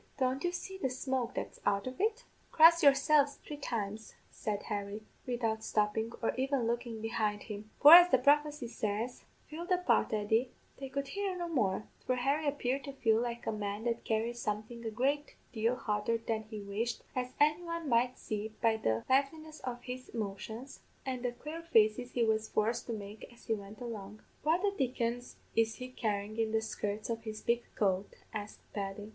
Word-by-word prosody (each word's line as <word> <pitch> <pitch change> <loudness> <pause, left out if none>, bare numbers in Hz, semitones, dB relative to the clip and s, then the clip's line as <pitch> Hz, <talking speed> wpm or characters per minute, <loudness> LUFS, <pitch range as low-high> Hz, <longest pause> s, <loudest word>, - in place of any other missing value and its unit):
Don't 260 0 0
you 350 - +1
see 380 +2 -6
the 265 - 0
smoke 260 -1 -2
that's - - -4
out 200 0 +1
of 255 +4 -5
it?' 445 +3 +1 0.3
"'Cross 330 +1 +8
yourselves 285 0 +5
three 300 - -5
times,' 220 -6 -4 0.2
said 205 -1 -3
Harry, 205 0 -4 0.2
widout 225 -3 -1
stoppin', 215 +2 0
or - - +2
even 265 -2 +1
lookin' 235 -1 -2
behind 215 -2 -1
him, 210 -1 -7
'for, 295 +2 +11
as 355 +1 +11
the 260 - +6
prophecy 290 0 +3
says 225 +2 -3 0.2
Fill 330 +3 -6
the 365 -1 +3
pot, 275 -11 +2
Eddy 220 +4 +1
' - - -34
They 270 -1 -5
could 280 0 -3
hear 395 +1 -2
no 345 -1 -2
more, 215 - +1 0.2
for 255 - +1
Harry 280 +5 +1
appeared 275 -1 0
to 275 - -6
feel 225 -4 +3
like 235 0 -3
a - - 0
man 205 0 -3
that 235 -1 -1
carried 230 +2 0
something 220 +2 -4
a 225 - -2
great 275 +7 0 0.2
deal 230 +2 +1
hotter 210 0 0
than 225 -1 -3
he 215 -2 -6
wished, 215 +4 -3
as 250 0 -2
anyone 335 +2 +1
might 245 0 +2
see 215 0 -4
by 225 -1 +3
the 110 - 0
liveliness 305 +4 +1
of 245 -1 -5
his 255 0 -7
motions, 220 +4 -5 0.3
and 260 -2 -2
the 245 - 0
quare 305 +7 -7
faces 245 -6 +3
he 240 - +2
was 220 -1 +1
forced 220 +2 0
to - - -3
make 210 +1 -8
as 240 - -18
he 225 - +1
went 205 0 -7
along. 215 -4 -7 0.2
"'What 325 +5 +2
the 405 -1 +2
dickens 245 -3 -1 0.2
is 225 0 +3
he 255 0 -7
carryin' 215 -3 -2
in 220 -1 +1
the 220 - +3
skirts 210 0 -3
of 225 0 -2
his 215 -1 -7
big 235 0 +2
coat?' 195 -1 0 0.2
asked 210 -1 -6
Paddy. 200 +1 -4
235 Hz, 190 wpm, -33 LUFS, 215-275 Hz, 0.3 s, for